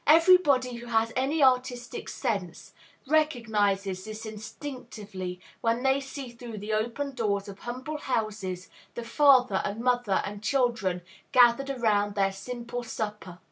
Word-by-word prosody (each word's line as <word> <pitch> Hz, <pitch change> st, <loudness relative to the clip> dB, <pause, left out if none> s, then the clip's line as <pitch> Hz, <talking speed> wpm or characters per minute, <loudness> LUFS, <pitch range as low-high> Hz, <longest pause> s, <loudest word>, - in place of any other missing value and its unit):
Everybody 300 Hz, -7 st, +5 dB
who 240 Hz, 0 st, -9 dB
has 225 Hz, -1 st, +1 dB
any 275 Hz, +4 st, +1 dB
artistic 250 Hz, -2 st, +1 dB
sense 195 Hz, -, -3 dB, 0.3 s
recognizes 215 Hz, -10 st, +1 dB
this 215 Hz, +1 st, -7 dB
instinctively 215 Hz, -5 st, -7 dB, 0.2 s
when 230 Hz, +2 st, +1 dB
they 265 Hz, +1 st, +3 dB
see 270 Hz, -1 st, -7 dB
through 235 Hz, -2 st, -9 dB
the 210 Hz, +2 st, -4 dB
open 240 Hz, +6 st, -1 dB
doors 205 Hz, -5 st, -1 dB
of 200 Hz, 0 st, -9 dB
humble 260 Hz, +5 st, -5 dB
houses 210 Hz, -8 st, -2 dB, 0.3 s
the 235 Hz, -, -4 dB
father 255 Hz, -5 st, +5 dB
and 205 Hz, +2 st, -3 dB
mother 245 Hz, -4 st, +1 dB
and 205 Hz, 0 st, -6 dB
children 215 Hz, -8 st, 0 dB, 0.3 s
gathered 245 Hz, +2 st, +5 dB
around 210 Hz, -6 st, +1 dB
their 195 Hz, -1 st, +2 dB
simple 240 Hz, +4 st, -6 dB
supper. 210 Hz, -6 st, -5 dB
235 Hz, 135 wpm, -28 LUFS, 205-255 Hz, 0.3 s, Everybody